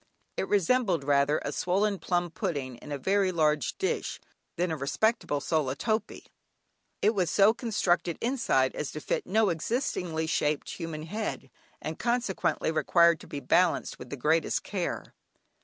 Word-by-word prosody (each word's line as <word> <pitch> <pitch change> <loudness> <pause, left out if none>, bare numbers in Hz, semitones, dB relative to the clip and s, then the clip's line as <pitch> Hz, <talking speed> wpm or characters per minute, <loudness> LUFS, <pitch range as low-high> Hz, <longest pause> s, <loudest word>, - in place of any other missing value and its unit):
It - - -2
resembled 200 - +2
rather 140 +1 +3
a 140 - -1
swollen 195 +5 0
plum 175 -2 -1
pudding 140 - -3
in 150 - -11
a 145 - -2
very 190 +5 +2
large 150 -6 +1
dish, - - -2 0.4
than 175 0 0
a - - 0
respectable 145 - 0
sola 140 -3 0
topee. 215 +6 -2 0.8
It 210 - +5
was 185 -6 +1
so 200 +5 +5
constructed 185 -8 0
inside 230 - +1
as 150 - -3
to 155 - -4
fit - - -2
no 215 +2 +3
existingly 170 - -2
shaped 150 -2 0
human 165 -3 -5
head, 210 +7 -4 0.3
and - - -5
consequently 195 -10 0
required 170 +1 +4
to - - -13
be 145 - -6
balanced 170 +6 +2
with 125 - -9
the 140 - -5
greatest 160 +5 +1
care. - - -4
170 Hz, 155 wpm, -28 LUFS, 150-200 Hz, 0.8 s, It